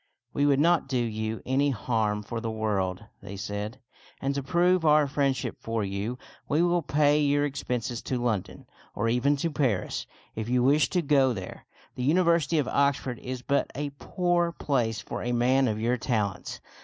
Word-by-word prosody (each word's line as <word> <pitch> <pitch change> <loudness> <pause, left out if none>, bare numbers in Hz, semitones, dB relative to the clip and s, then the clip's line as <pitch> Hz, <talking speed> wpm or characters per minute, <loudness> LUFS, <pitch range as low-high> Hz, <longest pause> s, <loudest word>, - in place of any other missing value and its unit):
"We 145 0 +2
would 140 -1 +3
not 170 -1 +3
do 135 -2 -1
you 110 -2 -2
any 135 +2 +2
harm 105 -3 -1
for 115 +2 -5
the 115 - -3
world," 105 -4 -2 0.2
they 100 - -8
said; 105 +4 -5 0.2
" - - -26
and 140 +1 -1
to 140 - -2
prove 175 +4 +2
our 150 -1 +5
friendship 135 -3 -1
for 115 -1 -2
you, 100 +5 -3 0.3
we 155 +4 +3
will 175 0 +2
pay 145 0 +3
your 145 0 +2
expenses 125 -4 -3
to 130 - -1
London, 110 -6 -2 0.3
or 115 - 0
even 125 +5 +2
to 160 +4 -2
Paris, 125 -11 -1 0.3
if 110 +1 -4
you 125 0 +2
wish 145 +4 +4
to 180 -2 0
go 135 -3 +3
there. 95 -4 -8 0.3
The - - -6
University 170 +1 +3
of 145 - +1
Oxford 140 -3 +1
is 125 -1 -6
but 140 +2 +1
a 145 0 -3
poor 175 -2 0
place 120 -9 -1
for 100 - -6
a 120 - -1
man 130 +2 +3
of 110 -2 -1
your 120 +3 +1
talents. 105 -5 -2
130 Hz, 185 wpm, -27 LUFS, 110-145 Hz, 0.3 s, our